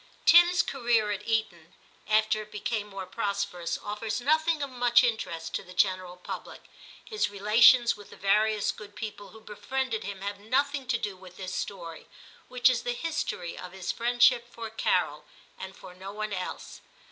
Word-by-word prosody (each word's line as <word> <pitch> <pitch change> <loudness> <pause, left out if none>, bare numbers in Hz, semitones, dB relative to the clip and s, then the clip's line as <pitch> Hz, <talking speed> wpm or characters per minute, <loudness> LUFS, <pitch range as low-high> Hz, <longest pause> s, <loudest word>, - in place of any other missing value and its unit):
Tim's 345 0 +7
career 235 -5 +1
at 205 - -5
Eton, 185 -7 -2 0.3
after 215 0 +3
it 215 0 -12
became 210 0 -3
more 195 -2 -7
prosperous, 200 -3 -2
offers 210 +2 -4
nothing 315 +3 +2
of 280 - -5
much 245 0 +4
interest 170 -9 -2
to - - -1
the 180 -1 -14
general 185 -2 +1
public, 180 - -8 0.4
his 430 - -1
relations 230 +4 +5
with 205 -1 -14
the - - -12
various 210 +1 +2
good 205 -1 -12
people 205 -2 -7
who 220 - -15
befriended 230 +2 -3
him 195 0 -6
having 200 +1 -6
nothing 280 +1 +1
to 245 -2 +1
do 205 -4 -4
with 185 -1 -14
this 185 -1 -6
story, 170 -5 -6 0.4
which 250 0 +3
is 255 -2 +3
the 245 - -2
history 275 - -3
of 180 0 -9
his 190 -2 -3
friendship 240 0 +3
for 230 -1 -7
Carol, 225 - 0 0.4
and 190 0 -8
for 185 -1 -12
no 190 +2 -8
one 215 0 -4
else. 185 -1 -6
215 Hz, 170 wpm, -28 LUFS, 195-240 Hz, 0.4 s, Tim's